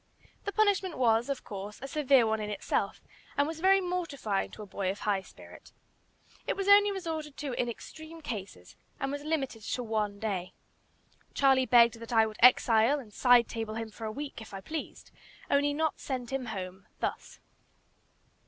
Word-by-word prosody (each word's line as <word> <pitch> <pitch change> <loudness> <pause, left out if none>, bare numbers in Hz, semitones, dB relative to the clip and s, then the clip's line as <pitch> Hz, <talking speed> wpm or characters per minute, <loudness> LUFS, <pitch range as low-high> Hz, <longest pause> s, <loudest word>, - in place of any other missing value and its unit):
The 405 - -1
punishment 405 -4 +2
was, 235 0 +3
of 275 - -3
course, 205 +1 -7
a 270 - -6
severe 275 -4 +4
one 220 0 0
in 210 - -4
itself, 200 -1 -2 0.4
and 285 - +4
was 320 +1 -5
very 385 +3 +5
mortifying 335 - -2
to 215 - -9
a - - -8
boy 195 -1 -3
of 195 - -4
high 200 -2 +1
spirit. 190 - -15 0.8
It - - 0
was 390 0 -3
only 405 0 +7
resorted 320 -6 -5
to 285 -3 -4
in 240 0 -1
extreme 315 +7 -9
cases, 195 - -7 0.2
and 275 - -2
was 285 0 -4
limited 280 -7 -2
to 245 +3 -3
one 215 -3 -1
day. 195 -4 -3 0.8
Charlie 265 -2 +4
begged 235 -1 +6
that 230 +1 -9
I 225 -1 +6
would 215 -1 -7
"exile" 240 +1 +6
and 220 -6 -12
"side 245 0 +5
table" 225 -1 -4
him 225 -1 -5
for 225 - -8
a 215 - -3
week, 280 0 -6
if 210 -2 -10
I - - -5
pleased; 315 +8 -7 0.4
only 285 +1 +3
not 315 +1 -1
send 255 -3 -4
him 270 -2 -2
home 190 -3 -6
thus. - - -4
245 Hz, 180 wpm, -30 LUFS, 215-295 Hz, 0.8 s, only